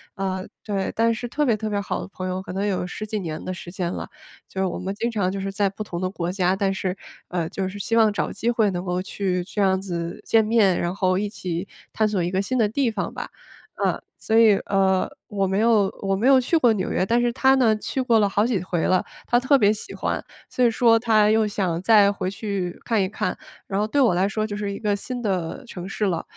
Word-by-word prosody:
呃， 190 -1 -2 0.2
对。 195 -3 -1
但 230 +1 +3
是 240 +2 -5
特 295 +5 0
别 235 -5 +3
特 215 +1 -4
别 205 - -1
好 200 - -3
的 - - -7
朋 185 -1 -6
友， 185 0 -2
可 185 - -8
能 195 +2 -1
有 185 -3 -1
十 210 +4 -6
几 215 0 -3
年 160 -4 -5
的 185 - -3
时 175 -1 -9
间 180 -2 -2
了， - - -6 0.4
就 190 - -6
是 190 - +2
我 180 - -3
们 190 +2 -4
经 230 +3 -1
常 200 -5 0
就 195 - -4
是 195 0 -3
在 200 0 +1
不 205 +2 -6
同 175 -3 -5
的 185 - 0
国 175 -2 -3
家， 185 0 +1
但 195 0 0
是， 190 0 -3 0.3
呃， 175 -2 -2
就 190 -1 -3
是 205 - -8
希 225 +3 0
望 220 -2 +5
找 205 - -2
机 230 +4 -2
会 225 -4 +2
能 175 -1 -3
够 180 -1 -1
去 185 -1 -2
这 195 +3 -3
样 190 -1 +3
子 170 -3 -4
见 225 -1 +4
面， 215 -4 +3
然 175 +2 -2
后 185 -1 +1
一 205 0 -2
起， 180 -2 -4 0.3
探 220 - +2
索 200 -4 0
一 175 - -1
个 190 - +1
新 255 +6 -2
的 220 -3 +3
地 250 +3 0
方 215 -3 -3
吧。 - - -6 0.5
呃， - - +1 0.2
所 220 - -1
以， 220 -3 +6
呃， 190 -1 +2 0.2
我 195 -2 -1
没 190 +1 0
有 220 -4 +4
我 195 0 +1
没 225 +7 +1
有 270 -1 +7
去 255 +7 0
过 245 -7 +4
纽 195 -3 -2
约， - - +1
但 235 +4 +2
是 240 0 +2
她 265 +1 +4
呢， 235 -5 +4
去 265 - -4
过 235 -3 +3
了 205 - +3
好 205 +2 +2
几 230 -7 0
回 175 -2 -2
了。 185 -1 +2 0.2
她 240 - +3
特 260 +3 +4
别 210 -4 +4
喜 215 - -7
欢， - - -2 0.3
所 250 - 0
以 240 - +6
说 230 0 +4
她 215 -2 +4
又 220 -1 +3
想 185 -5 -1
再 205 -1 +6
回 195 -2 -3
去 195 -3 -4
看 225 -4 +2
一 190 - +1
看。 215 - -2 0.3
然 195 0 -1
后 210 - +1
对 285 +6 0
我 240 -9 +5
来 185 +3 +2
说 215 +1 -1
就 205 - -4
是 205 -1 -3
一 200 - -5
个 210 -2 0
新 250 +5 -5
的 190 +1 -2
城 185 -5 -7
市 210 - -1
了， 175 -4 -1
200 Hz, 280 characters per minute, -23 LUFS, 185-220 Hz, 0.5 s, 有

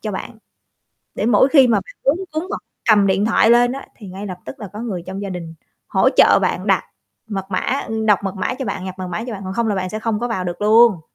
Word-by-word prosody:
cho 215 -2 -4
bạn, 220 +4 -7 0.8
để 210 - -2
mỗi 240 +3 +5
khi 270 -4 +6
mà 235 - +3
bạn - - -13
cuống 310 +7 +2
cuống 315 +3 -3
hoặc - - -4 0.3
cầm 205 -2 +5
điện 190 +1 +2
thoại 225 0 +4
lên 240 +1 +5
á 275 - -7
thì 210 -5 -11
ngay 195 +3 -7
lập 185 -2 -6
tức 130 - -9
là 205 - -6
có 210 - -7
người 205 -7 -4
trong 190 +2 -6
gia 200 - -4
đình 170 -3 -7 0.3
hỗ - - +3
trợ - - +6
bạn - - -1
đặt - - +2 0.4
mật 195 -3 -4
mã 185 - 0 0.3
ưm, 220 0 -2
đọc 210 -2 +5
mật 195 0 -3
mã 250 - -2
cho 265 - -5
bạn, 195 -3 -4
nhập 185 - -5
mật 185 - -4
mã 180 +6 -4
cho 245 - -5
bạn, 200 - -8
còn 190 - -4
không 235 -1 0
là 210 - 0
bạn 185 -1 -3
sẽ 215 - -4
không 220 -1 -2
có 240 - -1
vào 190 -5 -2
được 175 -1 -5
luôn. 220 -3 +5
210 Hz, 280 wpm, -19 LUFS, 190-235 Hz, 0.8 s, khi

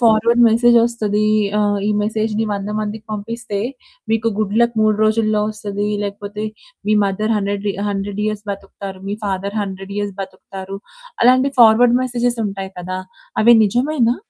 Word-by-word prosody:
Forward 235 +1 +4
message 235 +2 +4
వస్తది. 215 -3 0 0.3
ఆహ్, 205 -1 +1
ఈ - - +1
మెసేజ్‌ని 220 +1 -1
100 200 0 -3
మందికి 215 +1 -5
పంపిస్తే 215 0 -4 0.5
మీకు 225 0 +2
గుడ్ 210 -1 -1
లక్ 235 0 +3
3 215 -1 +3
రోజుల్లో 215 -1 +2
వస్తది. 210 -1 -3
లేకపోతే 205 +1 -5 0.5
మీ - - +4
మదర్ 215 +3 0
100 200 0 -2
రి - - 0 0.2
100 200 0 -3
ఇయర్స్ 215 0 -3
బతుకుతారు. 195 -1 -7
మీ 205 - -2
ఫాదర్ 200 +1 -3
100 195 0 -7
ఇయర్స్ 205 -1 -2
బతుకుతారు. 190 0 -8 0.4
అలాంటి 255 +2 +5
ఫార్వర్డ్ 235 +1 +6
మెసేజెస్ 245 -1 -1
ఉంటాయి 195 -1 -6
కదా! 185 +1 -4 0.4
అవి 235 +2 +7
నిజమేనా? 245 +2 +1
210 Hz, 145 wpm, -19 LUFS, 200-230 Hz, 0.5 s, అవి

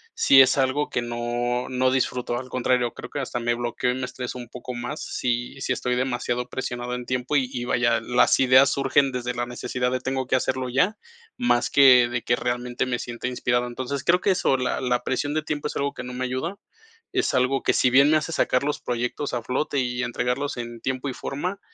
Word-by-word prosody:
si 135 - +7
es 130 - +4
algo 135 +2 +1
que 125 - -1
no 120 +1 -2
no 130 0 +1
disfruto, 125 -2 -1
al 130 +1 -7
contrario, 125 -1 0
creo - - -9
que 145 - -3
hasta 130 -2 -3
me 120 0 0
bloqueo 120 +1 -1
y - - -1
me 130 0 -3
estreso 125 0 -6
un 120 -2 -9
poco 125 +1 -7
más 120 +5 -5
si 125 +2 -3
si - - -2
estoy 125 0 0
demasiado 125 -1 -2
presionado 125 -1 -4
en 125 0 -6
tiempo 125 +3 -2
y 130 - +1
y, 120 - -3
vaya, 120 -2 +2
las 125 +2 +3
ideas 130 +1 +6
surgen 135 0 +2
desde 125 -1 -3
la 120 0 -1
necesidad 125 +1 -2
de, 130 - 0
tengo 130 0 -2
que 130 - +2
hacerlo 130 0 -1
ya, 160 - +1 0.4
más 185 - +2
que 130 -3 +6
de 120 -1 -3
que, 120 - +2
realmente, 120 0 -2
me 120 -1 -1
sienta 120 +1 -5
inspirado. 120 -1 0
Entonces, 130 +3 -4
creo 180 +1 +4
que 195 - +2
eso, 175 -7 +2
la 125 -1 -1
la 125 -1 0
presión 145 +3 -1
de 155 - 0
tiempo 150 -1 -3
es - - -7
algo 140 0 -1
que - - -7
no 125 - -7
me 130 +1 -2
ayuda, 130 +10 -3 0.6
es 370 -1 +1
algo 130 +1 +2
que, - - +2
si 130 - +3
bien 140 +3 +6
me 155 - +5
hace 155 +2 -3
sacar 125 -4 +1
los 145 +1 -2
proyectos 125 +4 -3
a 120 - -1
flote 140 +4 -2
y 125 -1 -1
entregarlos 125 +4 -2
en 120 -1 -6
tiempo 130 +1 -2
y - - -4
forma, 180 +11 -4
125 Hz, 225 wpm, -24 LUFS, 120-135 Hz, 0.6 s, si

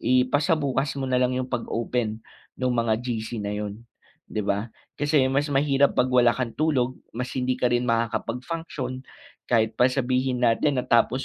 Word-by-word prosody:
Ipasabukas 135 +2 +1
mo 135 - -2
nalang 125 -1 +1
'yung 130 0 -3
pag 120 - -2
open, 115 -2 -2 0.4
nung 125 -1 +1
mga 115 -1 +2
GC 115 -2 -3
na 100 - -2
'yun 105 +1 -5 0.5
'di 105 - -3
ba? 100 +3 -1 0.3
Kasi 145 -1 +3
mas 145 +2 +1
mahirap 140 0 +3
pag - - +4
wala 120 -2 +4
kang 125 -3 -2
tulog, 130 -5 0 0.2
mas 125 +1 -3
hindi 130 -1 0
ka - - -3
rin 120 0 +1
makakapag 115 +2 -1
function. 145 -6 -5 0.5
Kahit 110 -2 +2
pa 125 +3 +4
sabihin 130 -1 0
natin 125 +5 +2
na 125 - 0
tapos 120 +3 +2
125 Hz, 170 wpm, -25 LUFS, 115-135 Hz, 0.5 s, pag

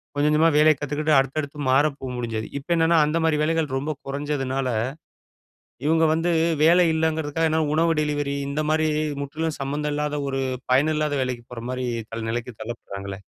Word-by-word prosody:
கொஞ்சம் 145 +1 +2
கொஞ்சமா 160 +2 +5
வேலைய 155 +1 +6
கத்துக்கிட்டு 150 +2 0
அடுத்தடுத்து 140 +2 -2
மாற 135 +3 +5
போ - - -7
முடிஞ்சது. 115 -2 -3
இப்ப 155 +5 -2
என்னான்னா, 165 0 +3
அந்த 150 +2 0
மாதிரி 160 -2 +2
வேலைகள் 160 0 +1
ரொம்ப 145 +3 -2
கொறஞ்சதுனால, 135 -2 -2 1.2
இவங்க 160 +2 +3
வந்து 165 +2 +1 0.3
வேலை 175 +3 +6
இல்லங்கறக்காக 160 0 0
என்ன 160 0 +2
உணவு 165 +1 +3
டெலிவரி 145 -1 -1
இந்த 150 +2 -1
மாதிரி 155 0 +2 0.3
முற்றிலும் 155 +3 -3
சம்மந்தம் 145 +2 -2
இல்லாத, 150 0 -1
ஒரு 135 0 -1 0.3
பயன் 145 +5 +4
இல்லாத 150 -1 0
வேலைக்கு 125 -2 -4
போற 115 -1 -7
மாரி 130 0 -3 0.3
தள்ள 115 0 -4
நிலைக்கு 120 +1 -4
தள்ளப்படுறாங்களே. 100 -4 -7
150 Hz, 160 wpm, -24 LUFS, 135-160 Hz, 1.2 s, வேலைய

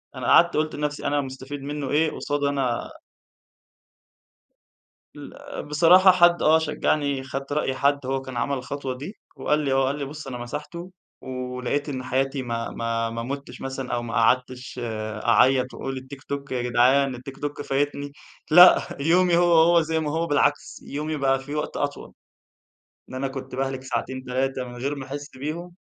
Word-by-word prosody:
أنا - - -4
قعدت 170 -1 +5
قُلت 155 0 0
لنفسي: 150 0 -3
"أنا 145 0 +1
مستفيد 135 +1 -7
منه 145 0 -4
إيه؟" 155 +2 +2
قُصَّاد 145 0 -3
أنا 135 -4 -1 2.3
ال - - -8
بصراحة، 175 +5 +6
حد 175 -1 +4
آه 160 +1 +5
شجَّعني، 145 -3 0
خدت 135 +1 -5
رأي 145 -3 0
حد، 140 0 +1
هو 135 0 -1
كان 130 -2 -8
عمل 140 +4 0
الخطوة 135 0 -4
دي، 150 - -8 0.2
وقال 150 - +1
لي، 140 -3 -1
هو 135 0 +3
قال 140 +2 -2
لي: 145 - -3
"بُص، 150 +2 -8
أنا 125 -2 -5
مسحته، 150 +8 -7 0.3
ولقِيت 125 +2 -3
إن 130 -3 -4
حياتي 135 +1 -1
ما 115 -1 -3
ما 115 0 -2
ما 115 0 -4
مُتِّش 135 0 -6
مثلًا، 135 -1 -4
أو 120 - -1
ما 115 -1 -6
قعدتِش 125 +3 +1
آآ، 110 -2 -5
أعيَّط 130 +2 +4
وأقول: 135 0 -5
الTikTok 140 +1 -7
يا 125 -1 -1
جدعان، 125 +2 +3
الTikTok 135 +3 -6
فايِتني." 145 0 -2 0.4
لأ، 180 +3 +8
يومي 175 +3 +3
هو 175 0 +4
هو، 170 +1 +5
زي 160 0 -1
ما 150 -2 -2
هو، 165 +2 0
بالعكس، 145 -1 0
يومي 155 +2 -4
بقى 135 -1 +2
فيه 140 +2 -7
وقت 150 - -3
أطول. 145 0 -4 1.0
إن - - -10
أنا 135 +1 -2
كنت 135 -1 -7
باهلَك 135 0 -2
ساعتين، 130 0 -3
3 130 +1 -1
من 120 0 -10
غير 135 +4 -2
ما 135 -2 -7
أحس 145 +2 -6
بيهم. 165 +6 -5
135 Hz, 170 wpm, -24 LUFS, 130-150 Hz, 2.3 s, لأ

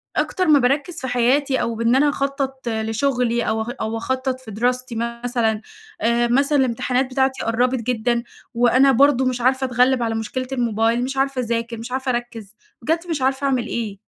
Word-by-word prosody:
أكتر 370 -2 0
ما 295 -2 +6
باركّز 285 +7 0
في 260 - -3
حياتي 260 +3 +2
أو 230 - -2
بإن 230 +2 +2
أنا 290 +2 +4
أخطّط 275 -2 -3
لشغلي 235 +2 0
أو 220 0 0
أخ 220 - -4
أو 220 +1 -2
أخطّط 260 +2 -2
في 245 -4 -11
دراستي 250 +3 -1 0.3
مثلًا، 230 -3 0 0.4
آآ 235 +1 +2
مثلًا 275 +4 +2
الامتحانات 255 +1 +1
بتاعتي 265 0 0
قرّبِت 245 +2 +1
جدًا، 235 0 0 0.3
وأنا 245 +3 +4
برضو 265 0 +4
مش 250 -1 -1
عارفة 260 +2 +2
أتغلّب 250 0 +2
على 225 -1 -1
مشكلة 255 +4 -3
الموبايل، 235 -1 +1
مش 270 +1 -4
عارفة 270 -1 0
اذاكر 230 -1 -2
مش 230 +2 -8
عارفة 260 0 -1
أركّز، 230 -3 -5 0.3
بجد 325 +7 +1
مش 300 -5 -2
عارفة 265 +1 0
أعمل 255 -4 0
إيه. 210 -4 -4
250 Hz, 180 wpm, -21 LUFS, 230-265 Hz, 0.4 s, ما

